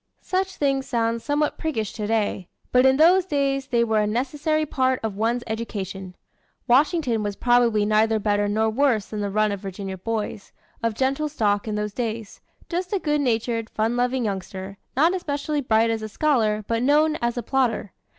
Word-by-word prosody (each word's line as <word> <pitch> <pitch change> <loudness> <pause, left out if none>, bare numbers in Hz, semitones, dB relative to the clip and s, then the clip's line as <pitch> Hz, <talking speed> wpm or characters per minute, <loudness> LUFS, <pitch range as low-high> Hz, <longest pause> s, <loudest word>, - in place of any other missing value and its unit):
Such 380 +1 -1
things 275 -2 0
sound 230 -1 0
somewhat 295 +2 -1
priggish 225 -10 -2
today; 210 -4 -1 0.2
but 250 +1 +5
in 265 0 +4
those 355 +5 +6
days 275 -5 -1
they 235 -2 +2
were 220 -2 +1
a 210 - +1
necessary 295 +7 0
part 260 -2 +1
of 220 -3 -2
one's 230 +3 0
education. 195 -4 -5 0.5
Washington 265 -2 +3
was 205 -1 -3
probably 240 -3 +3
neither 215 +1 +3
better 205 -1 +1
nor 220 +2 +1
worse 240 -3 +2
than 215 - -6
the 200 - -1
run 215 +1 +1
of 200 - -3
Virginia 190 -1 -6
boys, 215 0 -4 0.3
of 230 -1 -1
gentle 275 +5 0
stock, 210 -7 0
in 215 - -2
those 210 -1 -3
days 225 -3 -4 0.3
just 360 +1 -3
a 405 - +2
good 295 -5 0
natured, 230 -3 -1
fun 225 +2 -1
loving 245 0 0
youngster, 195 -1 -5 0.2
not 325 +6 +4
especially 295 -4 -2
bright 225 -2 +2
as 225 -1 -2
a 215 - -5
scholar, 215 -5 +1
but 230 0 0
known 300 +4 +3
as 235 +1 -2
a 240 - -2
plodder. 240 -5 0
230 Hz, 180 wpm, -24 LUFS, 215-275 Hz, 0.5 s, those